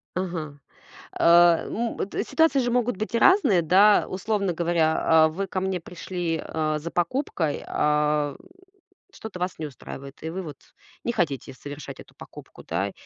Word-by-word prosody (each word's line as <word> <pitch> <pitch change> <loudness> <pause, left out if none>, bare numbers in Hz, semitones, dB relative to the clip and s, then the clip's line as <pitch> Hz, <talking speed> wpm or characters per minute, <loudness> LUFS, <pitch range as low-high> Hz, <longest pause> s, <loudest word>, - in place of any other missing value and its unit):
Ага. 165 -6 -4 0.6
А, 170 0 +6
м, 235 +1 -3
это 200 - -2
ситуации 320 +1 +2
же 245 -2 0
могут 245 -3 0
быть 215 +3 -3
и 230 - +2
разные, 375 - +5
да. 195 +6 +5
Условно 195 -1 -1
говоря, 165 -1 +1
а 160 -1 +5
вы 195 +5 -4
ко 185 - -3
мне 190 -1 -1
пришли, 175 -1 -4
а, 155 -1 -2
за 165 +3 -6
покупкой, 175 - -1
ам, 150 -1 +1 0.8
что-то 220 - -9
вас 180 +1 -3
не 155 - -3
устраивает, 140 0 -10
и 160 - -3
вы 185 +3 -4
вот 150 -5 -8 0.5
не 235 - 0
хотите 145 - -2
совершать 145 +2 -9
эту - - -14
покупку, - - -13
да. - - -2
175 Hz, 160 wpm, -25 LUFS, 155-200 Hz, 0.8 s, А